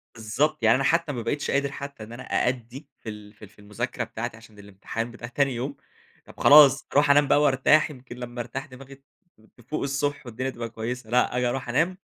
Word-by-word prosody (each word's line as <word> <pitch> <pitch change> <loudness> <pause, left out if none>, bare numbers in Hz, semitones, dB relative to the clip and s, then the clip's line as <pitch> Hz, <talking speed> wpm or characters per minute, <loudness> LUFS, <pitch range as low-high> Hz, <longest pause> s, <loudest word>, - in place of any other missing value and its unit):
بالضبط 125 +6 -1
يعني 110 +1 +6
أنا 135 - 0
حتى 165 +1 +2
ما 120 - -4
بقيتش 145 +5 -2
قادر 140 0 0
حتى 140 -4 -8
إن 110 +2 -10
أنا 125 +2 -8
أأدي 125 +3 -2
في 115 - -9
ال 105 -1 -10
في 105 - -19
ال 100 - -18
في 105 - -24
المذاكرة 105 +4 -4
بتاعتي 115 0 -6
عشان 110 -2 -17
الامتحان 100 +4 -6
بتاع 120 0 -9
تاني 135 +1 0
يوم، 135 +4 -4 0.5
طب - - -16
خلاص 140 -2 +7
أروح 145 0 +4
أنام 145 0 +5
بقى 145 - +4
وارتاح 150 +2 +4
يمكن 125 -3 -11
لما 120 0 -6
أرتاح 125 +4 -6
دماغي 135 -1 -13
ت 135 - -29 0.5
تفوق 125 +6 -5
الصبح 140 +1 -2
والدنيا 125 +2 -4
تبقى 120 -2 -6
كويسّة 115 +1 -5
لأ، 125 +1 +2
آجي 125 - +1
أروح 130 0 -4
أنام 165 +9 +1
125 Hz, 215 wpm, -25 LUFS, 115-140 Hz, 0.5 s, خلاص